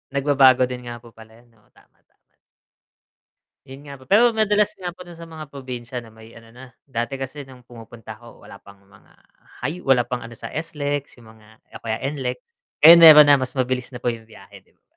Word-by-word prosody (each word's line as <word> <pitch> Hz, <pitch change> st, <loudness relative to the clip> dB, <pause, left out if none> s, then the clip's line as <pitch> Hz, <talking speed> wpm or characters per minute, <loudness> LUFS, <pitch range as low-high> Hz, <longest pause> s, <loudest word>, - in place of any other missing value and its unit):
Nagbabago 135 Hz, -2 st, +4 dB
din 125 Hz, -1 st, -8 dB
nga 120 Hz, -1 st, -9 dB
po -, -, -15 dB
pala 110 Hz, 0 st, -16 dB
'yon, 120 Hz, -1 st, -27 dB
oo, -, -, -33 dB
tama, -, -, -28 dB
tama. -, -, -47 dB, 1.3 s
'Yun 135 Hz, 0 st, -13 dB
nga 140 Hz, -, -9 dB
po, 130 Hz, -, -19 dB
pero 230 Hz, -, +3 dB
madalas 210 Hz, -1 st, +1 dB
nga 175 Hz, -2 st, -7 dB
po 180 Hz, -, -24 dB
do'n 170 Hz, -1 st, -13 dB
sa 170 Hz, -, -11 dB
mga 155 Hz, -2 st, -10 dB
probinsya 125 Hz, -3 st, -8 dB
na 110 Hz, -, -16 dB
may 110 Hz, +1 st, -17 dB
ano 115 Hz, 0 st, -16 dB
na, 130 Hz, +2 st, -13 dB, 0.2 s
dati 130 Hz, +1 st, -5 dB
kasi 135 Hz, +1 st, -8 dB
no'ng 125 Hz, -2 st, -17 dB
pumupunta 115 Hz, -2 st, -13 dB
ako 120 Hz, -1 st, -17 dB
wala -, -, -14 dB
pang 100 Hz, 0 st, -19 dB
mga 95 Hz, 0 st, -24 dB, 0.5 s
high 175 Hz, +4 st, -4 dB
wala 130 Hz, -5 st, +2 dB
pang 125 Hz, -1 st, -5 dB
ano 115 Hz, +1 st, -11 dB
sa -, -, -9 dB
SLEX, 145 Hz, -4 st, -5 dB
'yong 115 Hz, -2 st, -17 dB
mga 105 Hz, 0 st, -22 dB, 0.3 s
o -, -, -32 dB
kaya 110 Hz, +1 st, -5 dB
NLEX. 125 Hz, -3 st, -5 dB, 0.5 s
Ngayon 170 Hz, +1 st, +10 dB
meron 150 Hz, -3 st, +9 dB
na, 140 Hz, -2 st, +5 dB
mas 130 Hz, +1 st, -5 dB
mabilis 130 Hz, 0 st, -2 dB
na 125 Hz, -, -10 dB
po 120 Hz, -, 0 dB
'yong 115 Hz, -1 st, -12 dB
biyahe, -, -, -16 dB
'di -, -, -34 dB
ba? -, -, -50 dB
130 Hz, 215 wpm, -21 LUFS, 120-145 Hz, 1.3 s, Ngayon